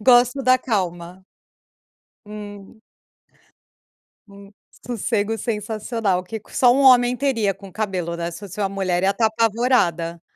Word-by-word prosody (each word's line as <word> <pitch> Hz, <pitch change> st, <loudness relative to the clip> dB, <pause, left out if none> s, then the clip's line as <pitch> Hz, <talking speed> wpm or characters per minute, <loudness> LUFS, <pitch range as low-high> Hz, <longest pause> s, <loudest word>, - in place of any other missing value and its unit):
gosto 245 Hz, +3 st, +4 dB
da 255 Hz, 0 st, +4 dB
calma. 180 Hz, -5 st, -3 dB, 1.0 s
Hum. 210 Hz, 0 st, -10 dB, 1.5 s
Hum. 200 Hz, 0 st, -15 dB, 0.3 s
Sossego 225 Hz, -2 st, -1 dB
sensacional 215 Hz, -3 st, -2 dB
que 220 Hz, +4 st, -6 dB
c -, -, -13 dB
só 245 Hz, -2 st, +5 dB
um 275 Hz, -, +2 dB
homem 250 Hz, -2 st, +5 dB
teria 230 Hz, -8 st, 0 dB
com 195 Hz, 0 st, -13 dB
cabelo, 185 Hz, -5 st, -3 dB
né. 170 Hz, 0 st, -4 dB
Se 170 Hz, -, -9 dB
fosse 205 Hz, 0 st, -9 dB
uma 195 Hz, -, 0 dB
mulher, 190 Hz, -2 st, -1 dB
ia 195 Hz, -, +3 dB
estar 225 Hz, +3 st, +1 dB
apavorada. 220 Hz, -7 st, 0 dB
210 Hz, 135 wpm, -21 LUFS, 190-235 Hz, 1.5 s, só